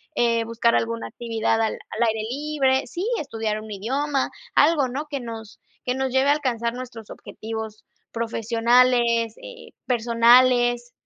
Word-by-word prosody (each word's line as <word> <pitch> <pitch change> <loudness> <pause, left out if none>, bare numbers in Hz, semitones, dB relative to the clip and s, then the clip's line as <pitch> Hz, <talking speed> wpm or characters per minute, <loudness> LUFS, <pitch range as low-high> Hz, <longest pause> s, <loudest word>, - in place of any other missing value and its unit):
eh, 230 -1 +2
buscar 230 +1 +1
alguna 230 0 -1
actividad 225 -1 -1
al 220 - 0 0.2
al 230 - 0
aire 220 -1 -1
libre. 275 -1 0
Sí, 355 +3 -4
estudiar 220 -6 -3
un 220 - -11
idioma. 265 +7 -1 0.2
Algo, 290 -3 +4
¿no? 275 +5 -4
Que 280 -2 -3
nos 225 -3 -9 0.3
que 250 - 0
nos 265 0 -1
lleve 265 +2 +2
a 290 - +6
alcanzar 235 -5 -1
nuestros 245 -4 -9
objetivos 220 -1 -7 0.3
profesionales, 235 0 +2
eh, - - -11
personales. 240 0 +4
235 Hz, 140 wpm, -23 LUFS, 225-265 Hz, 0.3 s, a